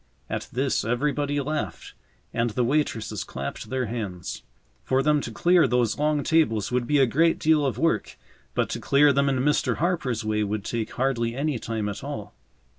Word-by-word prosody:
At - - -3
this 130 -1 0
everybody 145 +5 0
laughed 135 - -4 0.4
and 115 0 +1
the 120 +3 0
waitresses 115 -6 -1
clapped 70 +10 -6
their 130 -1 -1
hands. 90 - -5 0.4
For 130 - +1
them 150 0 +3
to - - -5
clear 175 -4 +4
those 120 -1 +1
long 150 -1 +1
tables 120 -11 +2
would 125 -1 0
be 150 - +3
a 135 - +6
great 165 +7 +3
deal 155 -1 +3
of 135 -3 -1
work, 165 +1 0 0.4
but - - +1
to - - -3
clear 140 +1 +4
them 140 +1 +2
in 135 - +1
Mr. 150 +2 +2
Harper's 140 -10 -1
way 105 0 +1
would 105 0 -3
take 115 -2 -3
hardly 120 -3 0
any 140 -2 -1
time 110 -2 -3
at 100 - -5
all. - - -6
130 Hz, 185 wpm, -25 LUFS, 110-150 Hz, 0.4 s, a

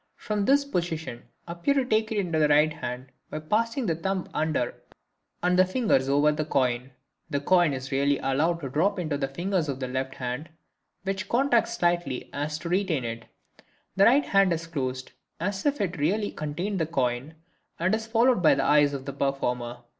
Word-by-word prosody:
From 210 -2 -2
this 280 +3 +4
position 165 - -3 0.2
appear 170 +11 0
to 270 -2 +2
take 220 -2 +1
it 220 - -1
in 185 -4 -1
the 155 -2 +3
right 150 +1 +4
hand 125 0 -6 0.2
by - - -5
passing 230 - 0
the 165 - +1
thumb 190 +2 -2
under 155 -5 0 0.7
and 180 0 +3
the - - +8
fingers 185 - +1
over 145 +2 +4
the 155 +1 -1
coin. 130 -4 0 0.4
The 140 - 0
coin 175 +1 +3
is 135 0 -5
really 140 +1 +2
allowed 160 +6 0
to 135 - -4
drop 175 +10 +1
into 160 -5 -2
the 135 - 0
fingers 170 +3 -1
of 135 -1 -3
the 130 - -3
left 130 +1 -3
hand, 125 +5 -4 0.5
which 195 0 -3
contract 240 -2 +3
slightly 175 - 0
so - - -4
as 150 +1 -2
to 155 +2 -6
retain 175 -8 0
it; 115 0 -5 0.7
the 195 - +5
right 275 +5 +5
hand 195 -2 +3
is 165 0 -4
closed 130 -5 -4 0.3
as 190 - -2
if 290 -2 0
it 185 -5 -2
really 205 +8 0
contained 175 +7 -3
the 160 - 0
coin 135 0 -1 0.4
and 180 +4 +1
is 220 0 -1
followed 235 -1 +3
by 160 - +5
the - - 0
eyes 145 -1 +4
of 135 -1 -7
the 140 - -5
performer. 125 -3 -2
160 Hz, 195 wpm, -26 LUFS, 135-195 Hz, 0.7 s, the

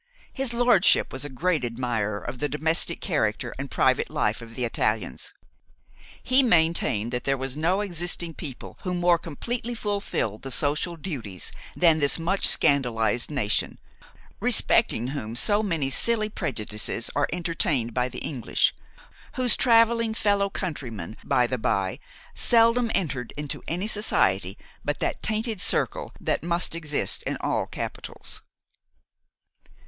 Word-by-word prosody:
His 265 -3 0
lordship 240 -6 +3
was 130 - -4
a 145 - -5
great 155 +3 0
admirer 115 -4 -2
of 120 +3 -7
the 145 - -1
domestic 160 +4 +2
character - - -1
and - - -5
private - - +2
life - - 0
of 115 -1 -11
the 125 - -1
Italians. 110 - -2 0.9
He 255 +2 +5
maintained 160 - +2
that 125 - -3
there 135 0 +1
was 130 0 -3
no 175 +6 +1
existing 175 -3 -1
people 140 -5 -8
who 180 -1 -2
more 175 -1 +3
completely 235 - -4
fulfilled 200 - -2
the 135 - -6
social 150 +6 -1
duties 125 - -5 0.2
than 165 -3 +4
this 145 -2 +3
much 180 +4 +2
scandalised 120 -5 +2
nation, 130 -9 -1 0.6
respecting 120 +3 +3
whom 115 -5 -5
so 205 - +4
many 165 -10 -1
silly 215 +5 +2
prejudices 115 - -2
are 145 0 +2
entertained 155 -8 -1
by 125 +1 0
the - - -6
English, 125 -7 +1 0.6
whose 250 -4 +3
travelling 230 -1 +3
fellow 200 -2 +2
countrymen, 120 - -5
by 125 - +2
the 125 0 -2
bye, 100 -4 -1 0.3
seldom 230 0 +3
enter 130 -9 -2
into 150 -1 -4
any 175 +4 -1
society 215 0 +1 0.3
but - - -1
that - - -2
tainted 220 -2 -1
circle - - +2
that - - -1
must 170 +1 -1
exist 150 - -2
in - - -2
all - - -1
capitals. - - -7
155 Hz, 140 wpm, -25 LUFS, 125-200 Hz, 0.9 s, He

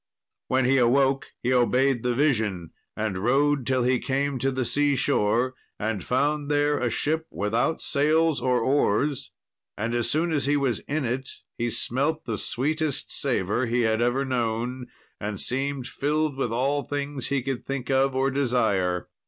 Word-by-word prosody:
When 130 0 +2
he 135 +1 +4
awoke 135 +2 +3 0.2
he 125 +1 +2
obeyed 125 +1 +3
the 125 0 0
vision, 110 - 0 0.3
and 105 -4 -2
rode 135 +4 +2
till 130 -2 +2
he 125 0 +2
came 140 0 -1
to 135 - +1
the 130 -1 -1
sea 145 +2 +2
shore, 120 +2 +1 0.3
and 105 -3 -2
found 145 +3 0
there 145 0 +2
a 120 - 0
ship 160 +6 -1
without 115 +9 -1
sails 155 +2 +2
or 125 -2 +2
oars, 135 +1 +1 0.5
and 115 +3 -2
as 120 -1 0
soon 165 +3 +1
as 145 -3 0
he 145 0 +3
was 130 -6 0
in 145 -1 -1
it 130 +3 -2 0.3
he 120 0 -1
smelt 140 +7 -1
the 110 -4 -3
sweetest 145 +2 -2
savour 120 -2 0
he 120 +2 +1
had 110 0 +1
ever 125 +3 +1
known, 125 0 -2 0.3
and 105 -1 -4
seemed 135 0 -1
filled 150 0 -1
with 130 -4 -2
all 135 +5 +1
things 140 0 -4
he 140 -3 0
could 135 -2 -3
think 135 -1 -3
of 135 0 +2
or 135 +1 +1
desire. 100 -10 +1
130 Hz, 170 wpm, -25 LUFS, 120-140 Hz, 0.5 s, he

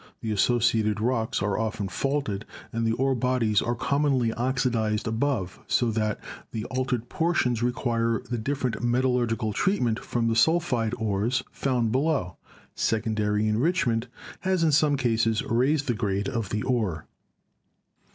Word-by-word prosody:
The 110 - -3
associated 110 -1 +2
rocks 115 -3 0
are 100 -1 0
often 110 -2 -2
faulted, 135 -4 -2 0.3
and 115 0 0
the - - +2
ore 135 +3 +1
bodies 120 -4 +1
are 120 - -1
commonly 135 -2 +1
oxidized 120 -4 0
above 110 -5 -1
so 120 -2 +2
that 110 -1 -1 0.3
the 110 0 -4
altered 125 -2 -1
portions 130 -9 +1
require 115 -2 0 0.2
different 130 -3 -2
metal 125 +2 +2
lurgical 115 -3 0
treatment 120 - +1
from 120 -1 -1
the 115 - +1
sulphide 125 -5 +2
ores 110 +4 0
found 125 -5 0
below. 135 - 0 0.4
Secondary 105 -1 0
enrichment 120 - +1 0.3
has 185 -2 +1
in 160 - +4
some 145 -1 +3
cases 115 -3 +1
raised 135 +6 +1
the 120 - +1
grade 100 -2 -1
of 115 -7 -2
the 105 0 -2
ore. 105 -11 -1
115 Hz, 140 wpm, -26 LUFS, 110-130 Hz, 0.4 s, in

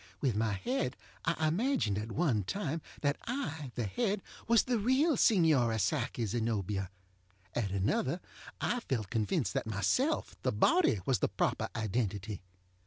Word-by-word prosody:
With 130 -7 +1
my 110 0 +1
head 130 - -1 0.3
I 160 -1 +1
imagined, 180 - +1
at 110 +2 -5
one 130 - +1
time, 165 - -2 0.2
that 145 -1 +1
I, 160 - -3
the 120 - -1
head, 205 - -1 0.2
was 230 -1 +5
the 245 -3 0
real 265 +8 +3
Signora 155 - +4
Psyche 105 +4 0
ZenobiaŌĆöat 105 -3 -1 0.6
another 105 - 0 0.4
I 245 - 0
felt 115 - -3
convinced 110 - 0
that - - -1
myself, 250 - +1
the - - +1
body, 345 - +3
was 130 -6 +2
the - - +1
proper - - 0
identity. 105 -2 -2
130 Hz, 140 wpm, -32 LUFS, -, 0.6 s, was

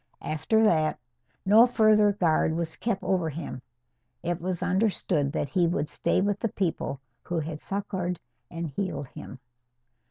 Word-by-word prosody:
After 160 +9 +1
that, 155 -7 +3 0.5
no 220 +5 +7
further 215 -3 +4
guard 160 -4 +2
was 165 -1 -3
kept 220 -5 -2
over 180 -4 +1
him. 145 -4 -6 0.6
It 175 0 -2
was 180 0 -2
understood 180 -6 +1
that 145 - -1
he 180 -3 +2
would 165 -3 -1
stay - - 0
with 205 +1 0
the 230 - -1
people 170 -8 -2 0.2
who 175 - -4
had 155 -1 -3
succoured 185 -3 -3 0.3
and 170 0 -4
healed 145 -3 -4
him. 130 - -10
175 Hz, 150 wpm, -27 LUFS, 160-200 Hz, 0.6 s, no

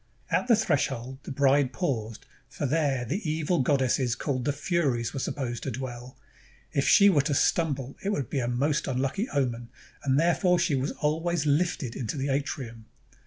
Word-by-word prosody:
At - - +1
the 235 - +6
threshold 135 - -1
the - - -6
bride 140 -1 +3
paused, 115 - -3 0.2
for - - -4
there 140 -3 +1
the 165 - -2
evil 160 +2 0
goddesses 130 -2 +2
called 130 -1 -2
the 145 - +2
Furies 140 -7 -1
were 135 - -3
supposed 125 -3 -3
to - - -3
dwell. 125 0 -7 0.5
If 140 - 0
she 200 - +7
were 170 -8 +5
to 140 +1 -1
stumble, 140 -4 +1
it 200 - -1
would 145 - -1
be 140 - -2
a 120 - -1
most 140 +5 0
unlucky 135 - -1
omen; 120 -4 -1 0.3
and 135 0 +2
therefore 175 +2 +3
she 170 -2 +1
was 135 +1 0
always 160 +1 -1
hfted 145 -4 0
into 125 +4 -4
the 140 +1 -2
atrium. 130 -5 -3
140 Hz, 175 wpm, -27 LUFS, 125-155 Hz, 0.5 s, she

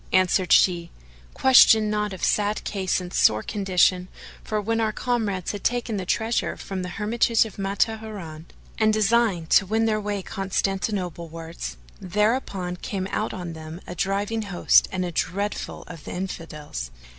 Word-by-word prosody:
Answered 185 0 +2
she, 170 -2 +4 0.5
"Question 225 -5 +6
not 210 -1 -1
of 190 - -8
sad 210 0 +1
case 190 -3 -1
and 180 0 -8
sore 110 0 +3
condition; 185 -2 +2 0.4
for 215 - -2
when 225 +2 0
our 220 -1 +1
comrades 215 -7 -1
had 205 - -7
taken 240 -3 0
the 185 -2 -4
treasure 225 +3 0
from 190 -1 -5
the 180 - -4
hermitage 225 +4 +2
of 215 - -10
Matruhina, 200 -5 -3 0.3
and 215 -1 +4
designed 215 -5 +2
to 195 - +5
win 220 +3 +1
their 215 -1 +1
way 205 -2 -3
Constantinople 195 -2 -2
wards, 165 - -7 0.2
thereupon 195 -2 -1
came 190 +1 -4
out - - -1
on 175 -2 -6
them 160 +1 -8
a - - -7
driving 200 +5 -1
host 195 -4 +3
and 185 -1 -2
a 175 - -4
dreadful 200 +5 -3
of 165 -4 -11
the - - -6
Infidels." 150 - -6
195 Hz, 155 wpm, -24 LUFS, 180-215 Hz, 0.5 s, Question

